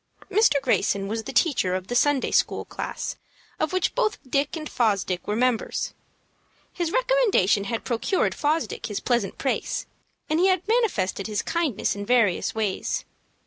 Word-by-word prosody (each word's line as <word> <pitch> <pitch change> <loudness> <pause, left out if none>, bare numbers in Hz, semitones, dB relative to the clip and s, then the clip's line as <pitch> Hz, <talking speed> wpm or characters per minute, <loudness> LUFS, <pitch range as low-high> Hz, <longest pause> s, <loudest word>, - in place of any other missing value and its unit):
Mr. 410 -8 +4
Greyson 200 -7 +1
was 225 +2 -3
the - - -4
teacher 245 - +2
of 185 0 -3
the 240 - -5
Sunday 275 +2 +2
school - - +1
class - - -5 0.4
of 310 - 0
which 370 -1 0
both 460 -4 +1
Dick 280 +5 0
and 310 -1 -5
Fosdick 200 -8 0
were 210 - 0
members. 245 -1 0 0.8
His 345 -2 -1
recommendation 485 - +3
had 230 +1 -3
procured 245 - 0
Fosdick 305 +2 -1
his 205 -3 -3
present 240 -1 0
place, - - -1 0.4
and 310 +1 +1
he 370 - +5
had 370 0 +1
manifested 360 - +1
his 210 -1 -2
kindness 325 - 0
in 200 - -5
various 220 -5 +2
ways. 215 -4 -1
255 Hz, 155 wpm, -25 LUFS, 205-340 Hz, 0.8 s, he